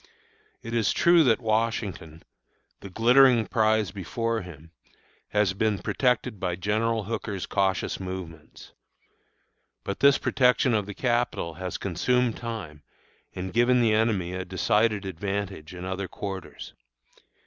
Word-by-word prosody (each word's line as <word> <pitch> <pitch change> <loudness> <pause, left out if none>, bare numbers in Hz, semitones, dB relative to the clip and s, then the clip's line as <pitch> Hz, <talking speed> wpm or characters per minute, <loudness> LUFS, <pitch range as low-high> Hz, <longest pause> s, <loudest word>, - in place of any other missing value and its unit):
It 115 - -6
is 115 -4 +1
true 170 -1 +5
that 115 -3 +3
Washington, 110 -8 -2 0.6
the 100 - -10
glittering 120 +3 +5
prize 110 -4 +1
before 115 +5 -3
him, 80 -3 -12 0.6
has 105 -3 +1
been 105 +1 0
protected 125 -3 0
by 90 -2 -2
General 110 +4 0
Hooker's 105 -2 -4
cautious 95 -3 -1
movements. 90 -4 -8 1.1
But 100 - -4
this 140 0 +6
protection 125 -1 +2
of 105 -2 0
the 105 - -7
Capital 120 -8 -1
has 90 +3 -5
consumed 120 +6 0
time 105 -11 -7 0.5
and 95 0 -5
given 120 +2 +4
the 115 -2 +3
enemy 105 -5 +1
a 95 0 -3
decided 105 +3 +1
advantage 95 -2 -4
in 90 0 -7
other 95 +1 -3
quarters. 95 0 -7
105 Hz, 125 wpm, -26 LUFS, 95-115 Hz, 1.1 s, this